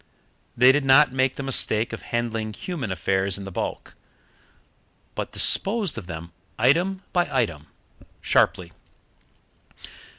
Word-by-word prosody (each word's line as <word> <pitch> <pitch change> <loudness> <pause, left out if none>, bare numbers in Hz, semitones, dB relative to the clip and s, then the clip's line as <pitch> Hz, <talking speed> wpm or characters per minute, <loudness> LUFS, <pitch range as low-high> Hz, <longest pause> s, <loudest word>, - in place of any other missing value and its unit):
They 125 +2 +7
did 145 +1 0
not 135 0 +5
make 130 0 0
the 140 - -6
mistake 115 -4 +3
of - - -6
handling 115 -2 -3
human 140 - -5
affairs 95 +2 -1
in 100 - -8
the 95 - -8
bulk, - - -5 1.2
but - - -5
disposed 205 -3 +1
of 105 -7 -8
them 85 0 -8 0.3
item 175 - +1
by 175 -4 +1
item, 95 - -2 0.5
sharply. 90 -4 +1
120 Hz, 125 wpm, -23 LUFS, 95-145 Hz, 1.2 s, They